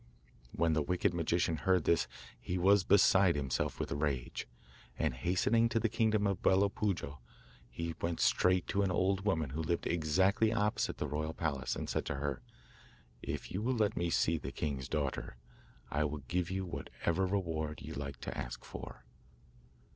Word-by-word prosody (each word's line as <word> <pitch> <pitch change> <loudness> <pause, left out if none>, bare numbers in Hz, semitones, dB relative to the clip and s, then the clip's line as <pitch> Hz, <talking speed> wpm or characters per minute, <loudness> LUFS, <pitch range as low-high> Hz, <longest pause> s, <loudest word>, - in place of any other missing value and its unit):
When 80 0 +1
the 80 - +2
wicked 90 +5 +1
magician 85 -1 +1
heard 95 +1 +2
this 80 -6 +2 0.3
he 90 - -3
was 95 +2 +5
beside 95 -2 +5
himself 65 -4 -1
with - - -3
rage, 70 -4 -2 0.5
and, - - 0
hastening 95 - +2
to 115 - +1
the 115 - +1
kingdom 110 -2 +2
of 100 -2 0
Bello 100 +2 +4
Puojo, 90 -9 -2 0.5
he 85 +7 -4
went 85 0 -1
straight 90 -1 +3
to 100 - +1
an 100 - +2
old 95 +2 +1
woman 80 -9 0
who 80 +4 -3
lived 85 +2 -1
exactly 95 +7 +2
opposite 105 -2 0
the - - -2
royal 80 +2 -3
palace, 70 -5 -1
and - - -4
said - - -1
to - - -2
her: 70 -2 -3 0.8
'If - - -5
you 95 - -2
will 125 +3 0
let 105 -3 +1
me 85 0 0
see 80 -1 +2
the - - -6
king's 70 -4 -3
daughter, 65 -5 -2 0.5
I 75 +1 +1
will 75 -1 -4
give 90 0 -1
you 95 0 -2
whatever 85 +1 -2
reward 80 -6 -2
you - - -6
like 70 -2 -5
to - - -5
ask - - -6
for. - - -9
85 Hz, 175 wpm, -33 LUFS, 75-95 Hz, 0.8 s, was